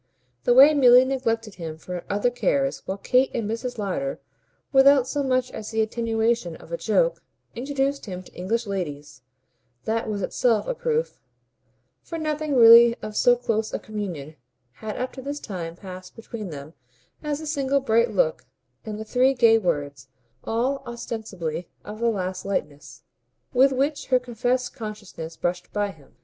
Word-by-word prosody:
The 245 - +4
way 280 +4 +9
Milly 255 -3 +7
neglected 230 -5 -1
him 160 -1 -5
for 180 +2 -7
other 205 +5 +1
cares 270 +2 0
while 190 - -3
Kate 255 +6 +2
and 225 -3 -1
Mrs. 245 +3 -4
Lowder, 245 +7 -3 0.5
without 270 -1 +6
so 290 +2 -1
much 255 -2 0
as 215 - -7
the 220 -1 +1
attenuation 225 -4 -1
of - - -15
a - - 0
joke, - - +1 0.3
introduced 275 +1 -2
him 185 -1 -6
to - - -18
English 225 +6 -2
ladies 150 - -5 0.6
that 225 0 -1
was 205 -2 -2
itself 230 0 +1
a - - 0
proof; 475 0 -2 0.8
for 330 - -6
nothing 305 -2 -2
really 235 0 +9
of 215 0 -6
so 245 +2 +5
close 225 -3 -2
a - - 0
communion 175 -9 -6 0.4
had 215 - -7
up 255 +1 -3
to 265 - -8
this 285 +2 -5
time 170 -8 -6
passed 185 0 -10
between 225 -3 -7
them 145 0 -9 0.5
as 300 -1 -2
the 315 - -8
single 280 -2 +1
bright 235 -2 +2
look - - 0 0.4
and 215 -1 -6
the 220 - -6
three 255 +4 +3
gay 225 -2 +5
words 145 - -2 0.4
(all 255 +5 -1
ostensibly 205 -8 -5 0.2
of 210 +1 -8
the 235 0 +2
last 185 -3 -3
lightness) 155 -7 -4 0.5
with 265 +2 +5
which 280 +3 -1
her 255 - +4
confessed 250 +1 -1
consciousness 205 -8 -8
brushed 175 0 -3
by 205 -1 -1
him. 150 -6 -21
230 Hz, 165 wpm, -24 LUFS, 195-265 Hz, 0.8 s, way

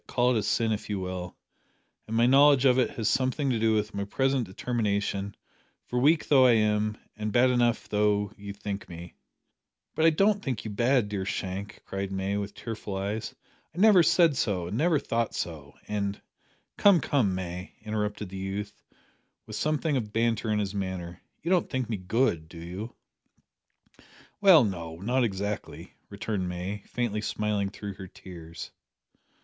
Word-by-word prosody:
Call 125 0 +2
it 110 - +2
sin 110 +2 +1
if 105 0 -3
you 100 -2 -1
will 90 -1 -5 0.7
and 110 +1 -2
my 120 - +5
knowledge 140 +1 +6
of 130 -1 +5
it 125 - +2
has 120 -7 -3
something 130 +3 +1
to 115 - 0
do 110 0 +3
with 105 0 -1
my 100 - -2
present 135 +4 0
determination, 100 -1 -2 0.5
for, 125 - -1
weak 155 +5 +3
though 130 -3 +6
I 120 - +6
am, 105 -1 +1 0.2
and 105 0 -3
bad 125 +3 +4 0.4
though 105 -1 +2
you 100 0 -8
think 100 +1 -6
me 85 0 -9 0.4
" - - -56
"But 160 - +2
I - - +8
don't 200 +5 +2
think 125 - -3
you 110 - -4
bad, 120 +2 +2
dear 100 -2 -3
Shank," 95 +1 -4
cried 95 0 -4
May, 95 +1 -1
with 100 0 -4
tearful 110 -3 -6
eyes; 105 +3 -3 0.4
"I - - -13
never 200 -2 +7
said 165 -2 +4
so, 95 -8 0
and 90 +5 -4
never 160 +5 +3
thought 115 -4 -1
so, 75 -4 -5
and 100 -1 -2 0.3
" - - -40
"Come, 200 -4 +6
come, 115 -12 +1
May," 90 0 -6
interrupted 105 -2 -3
the 95 - -7
youth, 100 +2 -5 0.6
with - - -8
something 155 0 0
of 110 -4 -3
banter 115 0 0
in 105 - +2
his 100 -2 -1
manner, 95 -3 -4 0.2
"you 170 - -1
don't 180 -2 +2
think 130 -2 -2
me 110 - -1
good, 95 -4 0
do 85 - -12
you?" 90 +8 -7 1.5
"Well, 185 -8 +8
no 85 -6 -3
not 120 +9 0
exactly," 105 -1 -4 0.2
returned 100 -2 -3
May, 90 +3 -4
faintly 115 -3 -2
smiling 105 -1 -1
through 100 0 -7
her 95 0 -9
tears. 85 -4 -10
105 Hz, 175 wpm, -28 LUFS, 95-125 Hz, 1.5 s, I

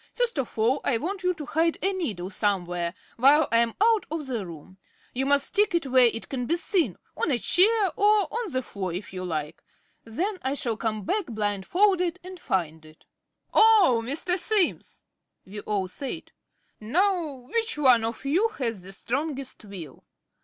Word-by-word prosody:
First 485 - 0
of 255 - -4
all 240 +6 +2
I 255 - +2
want 375 - -4
you 365 -1 0
to 300 - -7
hide 325 +3 +1
a 390 +1 +1
needle 205 - -4
somewhere, 175 -4 -1 0.2
while 280 +5 +5
I 230 - +4
am 235 -1 +1
out 440 0 +3
of 315 -2 -4
the 240 -6 -3
room. 170 +3 -12 0.3
You 265 +2 -1
must 285 0 +3
stick 415 -3 +2
it 335 - 0
where 255 -2 +5
it 230 -1 -4
can 250 -3 -4
be 335 - +2
seen 340 - 0 0.2
on - - -1
a 265 - +2
chair 400 - +3
or 415 -3 +3
on 460 -4 -3
the 255 -1 -1
floor 190 -5 -5
if 185 +3 -6
you 185 0 -5
like. 155 -4 -4 0.4
Then 365 - -3
I 265 +2 -1
shall 235 -5 -1
come 215 -2 -3
back 410 - -1
blindfolded 330 - 0
and 370 0 -10
find 160 - -2
it." 155 0 -18 0.5
"Oh, 415 - +5
Mr. 320 +9 +1
Simms!" 395 0 +1 0.4
we 205 +2 -8
all 200 -2 -2
said. 275 - -6 0.5
"Now, 305 - -1
which 460 -5 0
one 255 -6 +5
of 230 +4 -4
you 350 +11 +2
has 230 -7 -2
the 190 +2 -7
strongest 270 +4 -3
will?" 175 -9 -10
265 Hz, 180 wpm, -26 LUFS, -, 0.5 s, while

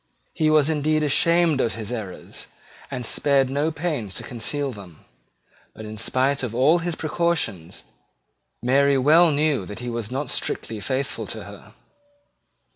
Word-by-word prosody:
He 155 -3 +2
was 155 -2 +4
indeed 155 0 +1
ashamed 165 0 +3
of 115 - -1
his 110 0 -6
errors, 105 -7 -7 0.4
and 125 -3 -5
spared 135 +1 +2
no 145 +4 0
pains 145 - -3
to - - -5
conceal 135 +4 -3
them: 95 -8 -13 0.7
but, 110 - -9
in 110 0 -7
spite 130 +4 +1
of 120 -3 -4
all 145 +8 +4
his 170 -1 -3
precautions, 155 - -1 0.8
Mary 140 +2 +4
well 160 +6 +6
knew 145 -5 +1
that 105 - -8
he 120 0 -5
was 115 -3 -4
not 135 +1 -3
strictly 110 -2 -2
faithful 130 +5 -3
to - - -6
her. - - -13
140 Hz, 150 wpm, -23 LUFS, 115-155 Hz, 0.8 s, well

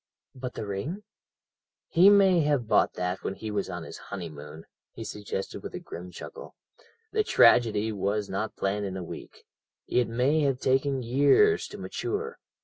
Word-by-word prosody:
"But 125 -1 -6
the - - -4
ring?" 140 - -4 0.8
"He 180 +4 +6
may 195 -3 +6
have 145 -6 +1
bought - - +3
that 90 +1 -2
when 95 - -3
he 110 +1 -6
was 100 -2 -2
on 90 -2 -5
his - - -9
honeymoon," 80 -4 -8 0.3
he - - -7
suggested 100 -2 -5
with - - -7
a - - -4
grim 90 +2 -9
chuckle; 470 - -10 0.6
"the 430 0 +2
tragedy 110 - +4
was 100 0 -1
not 100 +3 -3
planned 100 +1 -1
in 95 -1 -4
a 90 - -5
week, - - -10 0.4
it 125 -1 +2
may 130 +7 +2
have 135 -3 +1
taken 135 0 +1
years 145 - +4
to - - -9
mature. 455 +3 -4
115 Hz, 165 wpm, -27 LUFS, 95-145 Hz, 0.8 s, He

